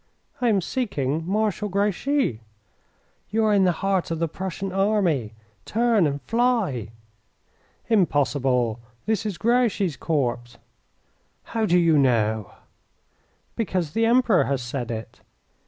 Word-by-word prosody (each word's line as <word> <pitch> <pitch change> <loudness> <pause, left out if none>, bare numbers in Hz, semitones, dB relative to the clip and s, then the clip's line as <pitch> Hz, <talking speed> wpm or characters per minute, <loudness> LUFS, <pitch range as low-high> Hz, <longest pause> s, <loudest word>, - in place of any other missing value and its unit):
"I 245 - +3
am 200 -3 +2
seeking 165 - -2
Marshal 210 +1 0
Grouchy." 200 - 0 0.9
"You 220 +2 +1
are 215 - +3
in 195 -2 +4
the 180 - +4
heart 195 -2 +1
of 165 - -2
the 165 +1 0
Prussian 190 +3 -5
army. 185 - +1 0.3
Turn 225 -6 +2
and 140 0 -3
fly!" 225 - 0 1.0
"Impossible; 135 - +1 0.3
this 220 0 0
is 200 -5 -4
Grouchy's 220 - +1
corps." 140 -7 0 1.0
"How 225 -2 -2
do 180 - +4
you 165 -4 +4
know?" 110 -6 +1 1.0
"Because 185 -8 -1
the 225 +6 +1
Emperor 235 -5 +4
has 135 -2 -1
said 120 0 -4
it." 110 -1 -7
185 Hz, 120 wpm, -24 LUFS, 140-220 Hz, 1.0 s, in